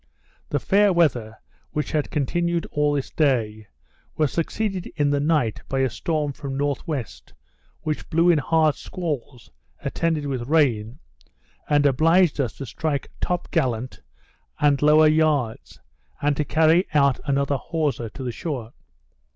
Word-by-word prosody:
The - - 0
fair 205 0 +3
weather, 125 -11 +1 0.4
which 150 - -2
had 150 -2 -1
continued 170 +4 -1
all 150 0 +1
this 140 -2 -3
day, 110 -8 0 0.5
was 155 -3 +1
succeeded 190 +2 -2
in 145 -2 +1
the 145 - +1
night 145 -7 +1
by 135 0 0
a 130 -2 +1
storm 150 +1 -2
from 135 -1 -6
north 145 +3 -2
west, 140 -9 -6 0.5
which 155 -1 -4
blew 170 +2 +4
in 160 - +3
hard 155 +1 +2
squalls, 145 - -6 0.3
attended 160 -3 -1
with 130 -4 -3
rain, 125 -8 +2 0.7
and 145 -1 +3
obliged 160 +3 +3
us 120 -5 -2
to 135 - -7
strike 145 +4 -3
top 180 -1 -2
gallant 130 -6 -1 0.6
and 145 -2 +3
lower 155 +1 +6
yards, 155 -7 0 0.4
and 145 0 +1
to 150 - -1
carry 160 +5 +3
out 140 -3 +4
another 140 0 +1
hawser 140 -7 -2
to 130 - -8
the 125 - -2
shore. 125 -4 -5
145 Hz, 145 wpm, -23 LUFS, 130-160 Hz, 0.7 s, lower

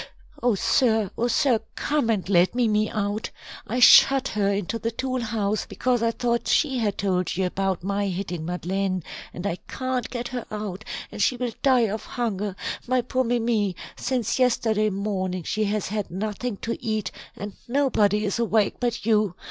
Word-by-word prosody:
"Oh, 240 -3 +3
sir, 220 -1 +2
oh, 240 - 0
sir, 245 -1 +3 0.2
come 295 -6 0
and 205 -5 0
let 185 +2 +3
Mimi 215 -3 +2
out. 205 0 -2 0.4
I 245 +4 -1
shut 270 +2 +7
her 200 -1 +1
into 200 +3 -2
the 230 - -1
tool 255 +2 -2
house, 215 -2 -1
because 250 -2 0
I 230 - +3
thought 235 0 -1
she 270 -5 +2
had 210 -4 0
told 185 -3 0
you 190 - +1
about 190 -1 -1
my 200 +1 0
hitting 180 -3 -3
Madeleine, 185 +2 -2 0.3
and 180 - -7
I 180 -3 -1
can't 255 -2 -2
get 240 -1 -4
her 245 -2 -5
out, 210 -2 -5 0.3
and - - -5
she 250 - +2
will 245 -2 -2
die 260 -3 +4
of 215 +2 -4
hunger 210 -5 -3 0.3
my 255 0 +2
poor 255 +2 0
Mimi 230 -5 +1 0.2
since 250 -2 -1
yesterday 225 -4 +2
morning 190 -3 -2
she 215 +6 -1
has 210 -1 -1
had 210 -1 -3
nothing 210 +4 -3
to 230 - -3
eat, 215 -3 -1 0.3
and 205 0 -6
nobody 220 -6 +2
is 205 +3 -1
awake 220 -2 +2
but 240 -3 -2
you. 210 -5 +2
215 Hz, 175 wpm, -25 LUFS, 200-240 Hz, 0.4 s, shut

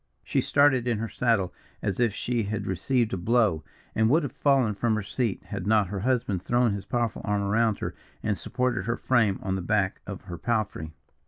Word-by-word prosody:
She - - +1
started 140 -4 +3
in 120 -3 +1
her 110 +1 -3
saddle 110 -7 +1 0.3
as 100 0 -1
if 120 -2 +3
she 120 +3 -1
had 105 -1 -3
received 115 +6 0
a - - 0
blow, 100 -4 +2 0.3
and 110 0 +3
would 155 +5 +4
have 140 - -3
fallen 135 -6 +2
from 110 +2 +1
her 110 - -2
seat 115 0 -2
had 90 - -5
not 105 -3 +3
her 100 0 -3
husband 115 -5 0
thrown 120 +1 +2
his 100 -1 -5
powerful 120 0 -1
arm 105 0 0
around 110 +1 +2
her, - - -4 0.3
and 105 -1 +1
supported 125 +3 -1
her 115 +1 -1
frame 110 -7 +2
on 95 - -1
the 95 - -2
back 95 +1 0
of 100 -2 -6
her 90 -4 -8
palfrey. 110 -9 -1
110 Hz, 205 wpm, -27 LUFS, 100-120 Hz, 0.3 s, would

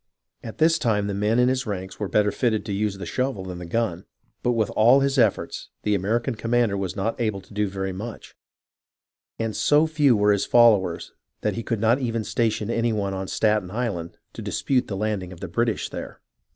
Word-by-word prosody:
At 110 - -8
this 165 +1 +4
time 110 -8 +1
the 100 - -2
men 105 +3 +1
in 125 0 +4
his 130 -1 0
ranks 95 -2 -5
were 105 - -2
better 105 +3 +2
fitted 110 -4 0
to 105 - -3
use 100 0 -1
the 95 - -6
shovel 130 -7 -2
than 90 -1 -6
the 90 - -7
gun, 95 -3 -1 0.4
but 125 - +1
with 110 -3 0
all 120 +5 +5
his 135 0 +1
efforts, 110 -5 0
the 105 - +1
American 115 +6 0
commander 115 -1 +1
was 95 -2 -3
not 110 +4 -2
able 110 -4 0
to 95 +2 -16
do 105 0 0
very 95 0 -3
much, 110 +5 -8 1.0
and 115 -1 -2
so 150 +2 +4
few 150 -7 +3
were 105 0 +4
his 100 - -1
followers 105 -8 +4 0.3
that - - 0
he 115 - -4
could 115 -1 -2
not 115 +4 +3
even 115 -4 -1
station 110 -1 -1
any 115 0 +1
one 100 -3 -1
on 95 0 -4
Staten 105 -2 +1
Island 100 -6 -3 0.2
to - - -8
dispute 130 -2 0
the 100 - -4
landing 100 -3 -2
of 90 - -11
the 95 - -5
British 115 +6 0
there. - - -7
110 Hz, 210 wpm, -24 LUFS, 100-120 Hz, 1.0 s, all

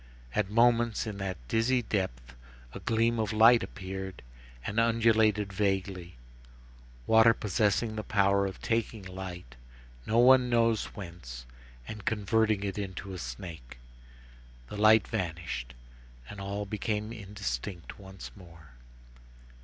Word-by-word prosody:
At 100 -2 0
moments, 115 0 +3
in 105 -2 -5
that 95 -2 -3
dizzy 120 - +2
depth, 65 - -3 0.4
a - - -6
gleam 115 +1 +1
of 110 -2 0
light 115 +2 +6
appeared, 95 -2 -6 0.4
and 105 +3 -1
undulated 110 -3 +3
vaguely, 95 -3 -1 0.9
water 110 +1 +6
possessing 110 +2 0
the 110 - -3
power 100 -1 +2
of 95 - -7
taking 115 -2 -1
light, 90 -8 -8 0.5
no 110 - +1
one 125 +1 +6
knows 115 -2 +2
whence, 85 -11 -9 0.4
and 105 -1 -7
converting 110 -1 +1
it 100 0 -3
into 95 0 -5
a 90 - -6
snake. 60 0 -8 0.9
The - - -6
light 110 +1 +5
vanished, 85 - -4 0.5
and 105 -1 -8
all 100 +1 -3
became 105 +1 -3
indistinct 100 - -5
once 95 -1 -10
more. 85 -7 -15
100 Hz, 120 wpm, -29 LUFS, 95-110 Hz, 0.9 s, light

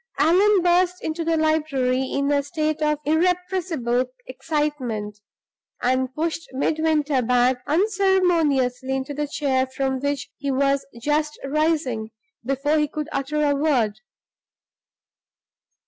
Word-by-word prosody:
Allan 375 +4 +4
burst 360 +1 +2
into 320 +1 -2
the 330 0 +1
library, 300 -5 +1
in 280 +1 0
a 285 -1 +3
state 310 +1 -2
of 300 0 +2
irrepressible 335 -6 0 0.2
excitement, 255 -7 -3 0.6
and 255 +1 +1
pushed 330 +1 -3
Midwinter 300 0 +1
back 250 +1 +2
unceremoniously 330 - +2
into 265 +2 -3
the 295 +1 -2
chair 270 -3 0
from 265 0 -2
which 285 0 -3
he 280 -1 -4
was 275 +1 +1 0.2
just 300 +1 0
rising, 280 -7 0 0.3
before 275 +4 +1
he 300 - +1
could 305 +1 -5
utter 300 +2 -1
a 285 - +3
word. 250 -8 +1
295 Hz, 115 wpm, -23 LUFS, 260-315 Hz, 0.6 s, Allan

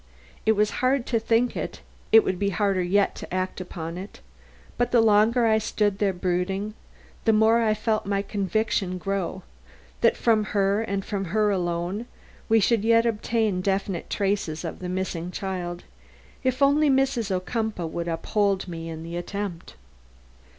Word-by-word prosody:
It 220 - +6
was 210 0 +2
hard 255 0 +2
to 230 - +1
think 230 +2 +1
it; - - -5 0.3
it 225 0 +8
would 185 -1 -2
be 200 - +1
harder 195 -1 +1
yet 195 +3 +2
to - - -9
act 185 0 -2
upon 170 -1 -6
it; 195 - -9 0.6
but 245 - +1
the 240 - +4
longer 225 +2 +4
I 220 -1 +4
stood 205 -2 0
there 205 -2 +2
brooding, 185 +3 -2 0.5
the 225 - +5
more 220 +2 +4
I 215 -2 +2
felt 215 -1 -1
my 200 0 0
conviction 195 -1 -1
grow 190 0 -3 0.6
that - - +4
from 220 -2 +3
her 200 +2 +2
and 200 -3 -3
from 195 -2 -3
her 210 +4 +1
alone, 180 +4 -2 0.4
we 225 0 +5
should 220 +1 +2
yet 230 +1 +4
obtain 220 -3 0
definite 195 -2 -2
traces 195 -5 -1
of 165 - -5
the 180 - -5
missing 180 -2 -3
child, 180 -2 -4 0.6
if 260 +1 +1
only 290 +2 +4
Mrs. 265 -5 +1
Ocumpaugh 195 0 -2
would 170 +1 -4
uphold 195 +3 0
me 165 -1 -6
in 160 0 -6
the 170 +1 -6
attempt. 180 0 -5
200 Hz, 165 wpm, -25 LUFS, 180-220 Hz, 0.6 s, it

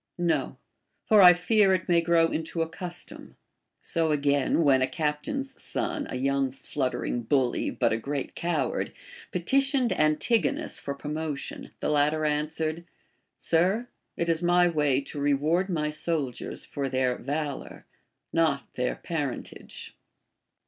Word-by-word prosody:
No; 175 -1 0 0.5
for 215 -2 +6
I 180 -1 +10
fear 190 +2 +3
it 185 - -4
may 170 -1 +4
grow 165 -1 +3
into 165 +1 -1
a - - -4
custom. 175 +1 -8 0.4
So 165 -2 0
again, 145 +1 +2
when 135 -3 +4
a 130 - +3
captain's 165 - -3
son, 340 -4 -2
a - - -4
young 135 +1 +1
fluttering 130 -2 -2
bully 125 +1 +1
but - - +1
a - - +1
great 140 +3 -4
coward, 170 0 -1 0.4
petitioned 265 - +2
Antigonus 155 +9 +1
for 140 - -4
promotion, 150 0 -5
the - - 0
latter 150 +1 +2
answered: 155 +2 -1 0.5
Sir, 190 +9 +1 0.3
it 170 - -1
is 165 0 +1
my 175 0 +4
way 150 -5 +2
to 145 - -7
reward 150 +7 +1
my 150 -4 -1
soldiers 150 -4 -3
for 140 -2 -3
theh 130 -1 +1
valor, 145 +1 -4 0.5
not 155 -4 +1
their 125 0 -1
parentage. 150 -6 -5
155 Hz, 135 wpm, -27 LUFS, 140-175 Hz, 0.5 s, I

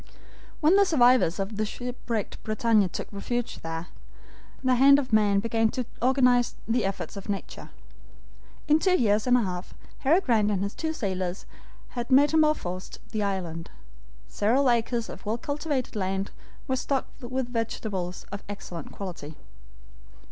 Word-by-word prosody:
When 325 +6 +5
the 400 - +7
survivors 250 - +4
of 200 +1 -3
the 215 - +1
shipwrecked 235 -1 -4
BRITANNIA 215 -2 +2
took - - -5
refuge 240 +4 -3
there, 165 +2 -5 0.7
the 255 -1 +3
hand 275 +3 +7
of 265 -5 -3
man 205 -2 +4
began 225 +1 +1
to 250 +2 -3 0.2
organize 250 -1 +3
the 230 0 +1
efforts 195 +1 -4
of 200 - -8
nature. 200 -1 -5 1.0
In 305 +1 +5
two 365 +1 +3
years 215 -1 +2
and 250 0 +6
a 240 - +2
half, 180 -2 -5 0.2
Harry 315 +7 +4
Grant 225 - +2
and 195 -2 0
his 200 - -3
two 320 -1 -2
sailors 190 - -3 0.4
had 240 -1 -5
metamorphosed 285 - +2
the 215 - -1
island. 180 -5 -3 0.6
Several 250 +5 +2
acres 235 0 0
of - - -9
well 215 +2 -1
cultivated 285 -1 -3
land 195 0 -2 0.4
were 260 - +1
stocked 270 +1 -2
with 255 0 -3
vegetables 205 -5 -3
of 200 0 -6
excellent 180 -4 -7
quality. 175 -6 -7
225 Hz, 150 wpm, -27 LUFS, 200-255 Hz, 1.0 s, the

